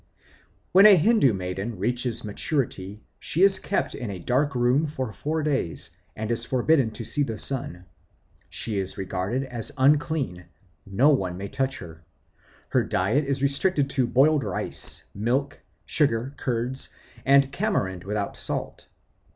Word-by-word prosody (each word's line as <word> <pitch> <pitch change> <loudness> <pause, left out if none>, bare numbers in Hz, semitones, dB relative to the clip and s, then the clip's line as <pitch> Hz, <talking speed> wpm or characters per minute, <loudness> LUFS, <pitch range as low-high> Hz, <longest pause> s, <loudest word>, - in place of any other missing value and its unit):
When 195 +3 +8
a 205 - +9
Hindoo 195 - +4
maiden 95 +3 -4
reaches 120 +3 -1
maturity 105 -3 -3 0.2
she 170 +5 0
is 195 -1 +6
kept 200 - -1
in 120 - -5
a 100 - -5
dark 130 - 0
room 125 +5 +2
for 130 -6 -4
four 155 +6 -2
days, 135 - -1 0.2
and 110 +1 -3
is 115 0 +1
forbidden 130 +1 +2
to 110 - -5
see 145 - 0
the 115 -6 -1
sun. 95 -10 -3 0.6
She 105 -3 -3
is 95 -1 -4
regarded 95 +7 -2
as 120 -4 -2
unclean; 140 - +1 0.4
no 105 +10 +3
one 95 -10 0
may 100 +1 -6
touch 135 0 -2
her. 80 -2 -11 0.7
Her - - +2
diet 110 +11 +1
is 140 0 -2
restricted 140 0 +1
to 130 -3 +1
boiled 140 +4 +3
rice, 100 -4 -1
milk, 130 +7 -1 0.3
sugar, 135 -3 0
curd, 125 +1 -2 0.4
and 140 0 +4
tamarind 100 - -1
without 100 0 -3
salt. - - -4
125 Hz, 145 wpm, -25 LUFS, 100-140 Hz, 0.7 s, a